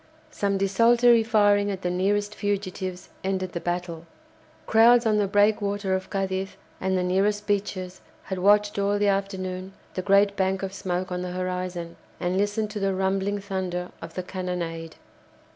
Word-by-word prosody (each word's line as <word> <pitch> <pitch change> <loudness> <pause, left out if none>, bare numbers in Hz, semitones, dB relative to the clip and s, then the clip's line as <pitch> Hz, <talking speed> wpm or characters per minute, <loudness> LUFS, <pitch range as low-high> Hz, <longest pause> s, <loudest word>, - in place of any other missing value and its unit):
Some 200 -1 0
desultory 230 +4 +4
firing 205 -2 +3
at 190 -2 -4
the 180 - 0
nearest 205 +3 0
fugitives 190 -3 -3
ended 190 -1 -1
the 170 - -3
battle. 175 -1 -4 0.6
Crowds 235 +2 +6
on 215 -1 +3
the 205 -1 +2
breakwater 205 -1 +2
of 190 0 -2
Cadiz 195 0 -2 0.2
and 190 0 0
the 180 - 0
nearest 200 +3 +1
beaches 195 -3 -2 0.2
had 190 -1 -4
watched 205 +2 +3
all 200 +1 +1
the 205 0 +2
afternoon 190 -1 -3 0.2
the 185 - -2
great 200 +1 +4
bank 190 0 0
of 190 0 -4
smoke 185 -1 -3
on 180 0 -2
the 180 0 -4
horizon, 180 -2 -4 0.2
and 180 +1 -1
listened 205 +2 0
to 210 - -4
the 195 -1 0
rumbling 195 +1 0
thunder 185 -3 -4
of 165 0 -9
the 185 - -3
cannonade. 175 -3 -4
195 Hz, 160 wpm, -25 LUFS, 185-205 Hz, 0.6 s, Crowds